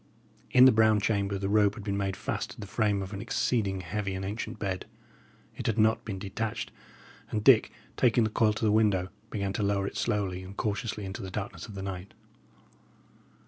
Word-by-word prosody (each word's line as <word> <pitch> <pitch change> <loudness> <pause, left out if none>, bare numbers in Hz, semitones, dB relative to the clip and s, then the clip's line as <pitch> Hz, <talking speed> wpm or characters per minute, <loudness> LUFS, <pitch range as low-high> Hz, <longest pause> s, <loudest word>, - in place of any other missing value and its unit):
In 125 0 +7
the 130 - +9
brown 110 -1 +4
chamber 100 -1 0
the 95 0 -2
rope 105 0 +3
had 105 - -8
been 100 -1 -2
made 100 -1 -1
fast - - -3
to - - -11
the 105 - -6
frame 105 -1 0
of 95 - -7
an 100 - -5
exceeding 105 -4 0
heavy 95 +2 -3
and 95 0 -4
ancient 105 +2 -4
bed. 95 -3 -3 0.7
It - - -4
had 110 - +1
not 110 0 +3
been 100 -3 -4
detached, 105 +3 -4 0.6
and 105 -1 -2
Dick, 130 -3 +6 0.3
taking 120 -1 +4
the 110 - 0
coil 110 -1 +3
to 110 - -2
the 105 - +4
window, 105 -4 +3 0.2
began 100 -3 -2
to - - -2
lower 100 -1 +1
it - - -5
slowly 95 -3 -1
and 95 +2 -10
cautiously 105 -1 -2
into 95 0 -6
the 95 - -5
darkness 95 -3 -5
of 105 - -10
the 95 - -5
night. 95 0 -6
100 Hz, 205 wpm, -29 LUFS, 95-110 Hz, 0.7 s, the